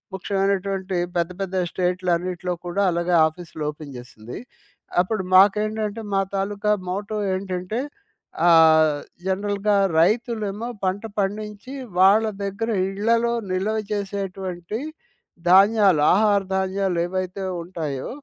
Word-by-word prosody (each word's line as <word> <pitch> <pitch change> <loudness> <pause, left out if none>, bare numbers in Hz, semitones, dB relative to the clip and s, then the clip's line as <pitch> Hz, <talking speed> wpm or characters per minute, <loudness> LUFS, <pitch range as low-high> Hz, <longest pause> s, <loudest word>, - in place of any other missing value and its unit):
ముఖ్యమైనటువంటి 195 -1 -1 0.2
పెద్ద 170 +1 0
పెద్ద 190 -1 -3 0.2
స్టేట్‌లన్నిట్లో 180 0 -1
కూడా, 180 +3 -1
అలాగే 175 +1 0
ఆఫీసులు 160 -1 -8
ఓపెన్ 150 -2 -11
జేసింది. 120 -1 -10 0.6
అప్పుడు 190 +2 -2
మాకేంటంటే, 210 +2 +3
మా 195 - +3 0.2
తాలూకా 205 +2 -1 0.2
మోటో 200 +3 -3 0.2
ఏంటంటే, 185 +3 -3 0.7
ఆహ్, 160 -2 +6 0.3
జనరల్‌గా 200 +1 0 0.2
రైతులేమో 220 +2 0 0.2
పంట 190 +2 -1 0.2
పండించి, 210 +4 -3 0.3
వాళ్ళ 200 +4 +6 0.2
దగ్గర 200 +4 -3 0.2
ఇళ్ళలో 230 +4 +1 0.2
నిల్వ 200 +4 0 0.2
చేసేటువంటి 195 -1 -4 0.7
ధాన్యాలు. 195 -3 +5
ఆహార 205 0 +3 0.2
ధాన్యాలేవైతే 190 0 -1 0.2
ఉంటాయో, 155 -7 -5
195 Hz, 95 wpm, -23 LUFS, 180-205 Hz, 0.7 s, ఆహ్